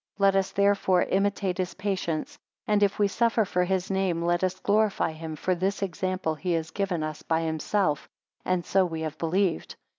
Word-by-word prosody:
6 - - -34
Let 195 0 +4
us 195 0 +1
therefore 200 -2 +3
imitate 195 -1 0
his 185 -1 -2
patience; 190 -5 -3 0.3
and 210 -1 +2
if 200 -1 +2
we 205 - +3
suffer 230 +1 +2
for 180 -1 +1
his 190 0 -1
name, 190 -3 0
let 175 +1 +1
us 185 0 0
glorify 205 -4 +2
him; 160 0 -7
for 185 +5 0
this 190 +3 -1
example 185 -2 -2
he 175 +3 -2
has 160 -1 -2
given 185 -4 -1
us 155 0 -5
by 160 0 0
himself, 160 0 0 0.3
and 185 -2 0
so 190 -1 +3
have - - -10
we 160 -1 -2
believed. 180 +2 0
185 Hz, 190 wpm, -27 LUFS, 165-200 Hz, 0.3 s, Let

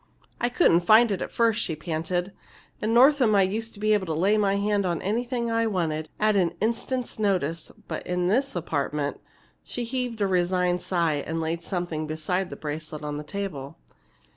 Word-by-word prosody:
"I 240 - +1
couldn't 170 -7 +4
find 215 +6 +5
it 195 - -2
at - - -4
first," 230 -2 +2
she 160 - -2
panted. 170 +4 -2 0.5
"In 215 - 0
Northam 250 -2 +5
I 195 - +5
used 225 +5 -2
to - - -13
be 215 +1 +3
able 200 -3 +1
to 160 - -1
lay 195 +6 +3
my 200 -2 +2
hand 205 0 +1
on 175 -3 -1
anything 235 +3 -1
I 230 0 +2
wanted, 160 -6 -1
at 215 0 +3
an 175 -3 +2
instant's 235 +3 -2
notice, 170 -6 0 0.2
but - - -4
in 180 0 0
this 255 +8 +1
apartment!" 150 -3 -2 0.4
She 245 - -5
heaved 245 -1 -3
a 205 - +2
resigned 180 -1 +1
sigh 165 -6 0
and 165 +1 -2
laid 165 +1 -2
something 175 -5 -3
beside 175 +4 -2
the - - -7
bracelet 155 0 -6
on 150 0 -3
the 150 - -5
table. 150 -7 -5
185 Hz, 190 wpm, -26 LUFS, 165-215 Hz, 0.5 s, find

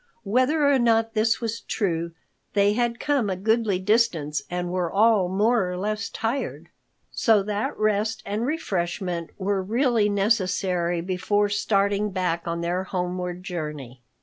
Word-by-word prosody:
Whether 255 +8 +2
or 280 -2 +4
not 225 -1 +2
this 225 +1 +2
was 230 0 -3
true, 170 -5 -2 0.4
they 205 0 +3
had 235 +1 0
come 280 -8 +1
a 190 - -1
goodly 220 0 +1
distance 185 -8 +1
and 180 0 -3
were 180 -2 -1
all 210 -3 +4
more 205 +1 +2
or 180 - -4
less 210 +2 -2
tired, 230 +5 -3 0.4
so 220 -4 +3
that 210 +1 -2
rest 215 +1 0
and 210 +3 -2
refreshment 180 - -2
were 195 0 0
really 230 +1 +2
necessary 185 -4 +1
before 190 +3 0
starting 200 0 +1
back 180 -3 -2
on 170 0 -2
their 175 +2 -1
homeward 180 -1 -3
journey. 150 -9 -6
200 Hz, 145 wpm, -24 LUFS, 180-225 Hz, 0.4 s, or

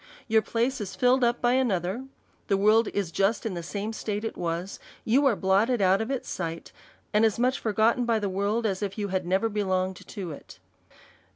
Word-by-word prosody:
Your 220 -1 +4
place 235 +3 -1
is 195 -2 -5
filled 250 +1 +3
up 240 0 +1
by 240 0 +3
ano 250 -8 +2
ther, 190 +10 -4 0.4
the 195 - +2
world 215 +3 +4
is 200 -5 -2
just 200 +6 +1
in 220 - -2
the 175 - -4
same 205 +6 -4
state 210 -1 -3
it 225 - -4
was, 175 +2 -3 0.3
you 270 +5 +4
are 240 - +3
blotted 200 +6 +2
out 190 +1 +3
of 220 - -3
its 270 -2 -3
sight, 165 -2 -5 0.4
and 210 +1 +4
as 220 -2 +3
much 255 +3 +1
forgotten 225 +3 +2
by 230 -1 +2
the 210 -2 -1
world 200 +4 -1
as 195 -2 -1
if 200 0 -3
you 205 -1 -2
had 185 -2 -2
never 190 +5 +2
belonged 190 -3 -1
to 190 -6 -6
it. 145 - -11
210 Hz, 210 wpm, -27 LUFS, 190-230 Hz, 0.4 s, Your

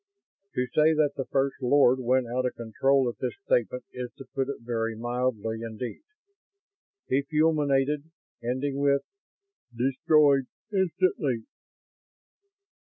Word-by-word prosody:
To 125 - +1
say 155 +1 +5
that 150 -2 +3
the 135 - -3
First 135 0 0
Lord 130 0 +4
went 130 +1 +2
out 125 +2 -1
of - - -5
control 130 +4 +1
at 120 - -4
this 125 - -2
statement 125 +1 +1
is 125 -1 -5
to 135 - -10
put 135 -1 -1
it 140 - -5
very 115 -1 -2
mildly 120 -1 -2
indeed. 115 +1 -6 1.1
He 135 - +2
fulminated, 150 -1 +1 0.3
ending 135 +3 -2
with: 140 0 +2 0.4
"... 395 - -32
destroyed 135 +2 +3 0.3
instantly!" 175 - +1
130 Hz, 125 wpm, -27 LUFS, 120-145 Hz, 1.1 s, say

